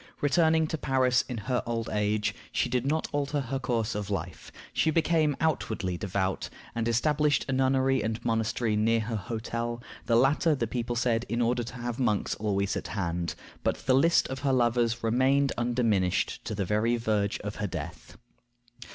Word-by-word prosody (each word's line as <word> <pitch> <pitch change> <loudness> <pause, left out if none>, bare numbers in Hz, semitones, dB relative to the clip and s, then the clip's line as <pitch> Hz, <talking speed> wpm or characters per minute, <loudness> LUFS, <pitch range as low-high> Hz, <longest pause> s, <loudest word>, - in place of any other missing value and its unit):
Returning 160 +2 +3
to 160 0 -3
Paris 130 -1 +2
in 125 - -3
her 125 -1 +1
old 115 -1 -2
age, 105 0 0 0.2
she - - 0
did 125 +1 0
not 155 +2 0
alter 145 0 -1
her 135 0 -3
course 115 -3 -1
of 105 -1 -4
life. 100 - -5 0.2
She 160 - +2
became 155 -2 +2
outwardly 110 - -1
devout, 95 0 -2 0.2
and 115 0 -1
established 150 +5 +2
a - - -2
nunnery 130 0 +2
and 110 +1 -2
monastery 115 0 0
near 115 +2 +2
her 110 +1 -3
hotel; 115 +2 -3 0.3
the 115 - +3
latter, 145 +6 +4
the 120 - -1
people 120 +1 -3
said, 115 -1 +1
in 120 +2 -1
order 120 +1 +1
to 120 +1 -7
have 120 0 -4
monks 110 -5 +1
always 100 -2 -1
at - - -4
hand; 85 -4 -2 0.3
but - - -1
the 130 - +4
list 165 +6 +4
of 130 0 -4
her 140 -1 +1
lovers 120 -1 +2
remained 130 +4 +3
undiminished 115 -6 0
to 110 - -3
the 100 -1 -1
very 110 +5 +1
verge 105 -3 0
of 105 +1 -5
her 105 - -2
death. - - -7
120 Hz, 175 wpm, -28 LUFS, 110-135 Hz, 0.3 s, latter